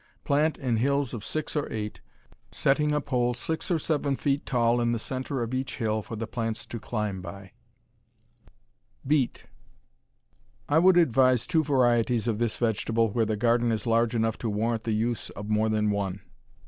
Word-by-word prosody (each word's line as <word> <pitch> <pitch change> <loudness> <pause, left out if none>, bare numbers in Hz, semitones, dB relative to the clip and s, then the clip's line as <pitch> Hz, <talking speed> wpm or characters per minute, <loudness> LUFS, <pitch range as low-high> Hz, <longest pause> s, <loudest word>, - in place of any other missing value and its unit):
Plant 150 +1 +2
in 125 -4 0
hills 140 +2 +1
of 110 -4 -5
six 155 +5 -3
or 150 - -1
eight, 105 -1 -5 0.5
setting 150 +2 +2
a 150 - +2
pole 125 -4 0
six 160 +6 -3
or 175 - +2
seven 145 -3 0
feet 140 +1 -1
tall 120 -2 +2
in 120 0 +1
the - - 0
center 130 +2 -3
of 115 +2 -5
each 130 +1 -3
hill 110 -3 0
for 115 - -7
the 115 +1 -3
plants 115 0 -3
to 115 - -6
climb 105 -4 -3
by. 95 +2 -9 1.5
Beet 140 -2 +1 1.2
I 150 +2 +4
would 180 +1 +5
advise 130 -6 +4
two 165 -3 +2
varieties 120 -4 +2
of 110 -2 0
this 120 -2 +1
vegetable 115 -1 +1
where 115 +1 +1
the 110 -1 -1
garden 120 +1 +2
is 110 -1 -2
large 115 0 +2
enough 115 -1 0
to 115 - -2
warrant 110 +2 -1
the 115 - 0
use 115 +2 -1
of 105 +1 -7
more 110 +1 +2
than 105 -1 +1
one. 100 -2 -2
120 Hz, 180 wpm, -27 LUFS, 110-135 Hz, 1.5 s, would